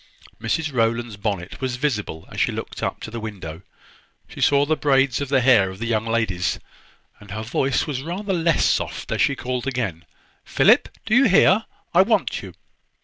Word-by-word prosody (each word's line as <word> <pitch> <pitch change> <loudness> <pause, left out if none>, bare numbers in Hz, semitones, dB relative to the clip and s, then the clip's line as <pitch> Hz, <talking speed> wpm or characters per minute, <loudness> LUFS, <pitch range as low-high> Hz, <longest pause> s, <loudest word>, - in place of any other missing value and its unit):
Mrs 155 +7 -1
Rowland's 115 -1 0
bonnet 100 0 -4
was 130 -2 -1
visible 105 - -3
as - - -3
she - - +2
looked - - -6
up - - -3
to 110 - -7
the 115 - -5
window. 95 -7 -7 0.7
She - - -10
saw 140 0 +4
the 155 +2 +1
braids 135 -3 +2
of 140 - -3
the 135 -2 +3
hair 120 -7 +5
of 95 - -9
the 115 - -4
young 115 -1 0
ladies, 110 -6 0 0.6
and 105 - -15
her 110 +2 -5
voice 130 +4 0
was 135 -4 -3
rather 190 +6 -3
less 165 -2 +2
soft - - -1
as - - 0
she 140 - +3
called 125 0 -4
again, 110 -11 -3 0.4
"Philip, - - +4 0.2
do 215 - -1
you 270 +4 +6
hear? 195 0 +5 0.3
I 175 - +7
want 220 +4 +1
you." - - -10
125 Hz, 190 wpm, -22 LUFS, 110-145 Hz, 0.7 s, I